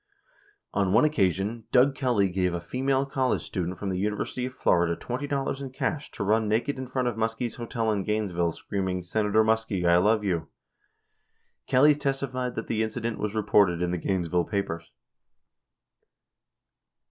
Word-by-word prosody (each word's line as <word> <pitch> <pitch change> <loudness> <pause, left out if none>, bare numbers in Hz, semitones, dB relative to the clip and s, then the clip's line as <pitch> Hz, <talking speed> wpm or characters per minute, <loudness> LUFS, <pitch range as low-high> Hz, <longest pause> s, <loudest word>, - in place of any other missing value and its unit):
On 100 -2 +1
one 120 +7 +5
occasion, 105 - 0
Doug 135 +2 +5
Kelly 125 -8 +1
gave 90 -1 0
a - - -2
female 135 +9 0
college 135 -2 0
student 90 -1 -3
from 100 +1 -4
the 90 -1 -2
University 105 +5 -2
of 130 - -10
Florida 85 -1 +2
$20 135 +4 -3
in 135 - -5
cash 140 +3 -3
to - - -3
run 110 +2 +2
naked 120 +6 0
in 130 - -5
front 130 0 -1
of 120 - -2
Muskie's 115 +1 -2
hotel 115 -2 -1
in 100 -2 -1
Gainesville, 95 -6 0
screaming, 95 0 -3
"Senator 105 +3 +2
Muskie, 110 -4 0
I 85 0 +6
love 105 +4 +3
you." 95 -3 +1
11 80 -1 -10 1.2
Kelly 145 +4 +6
testified 135 -3 -2
that - - -3
the 110 -1 -1
incident 115 +1 -2
was 105 0 -3
reported 100 -4 +3
in 90 - 0
the 90 - -1
Gainesville 90 -1 0
papers. 90 -5 -3
110 Hz, 160 wpm, -27 LUFS, 95-125 Hz, 1.2 s, I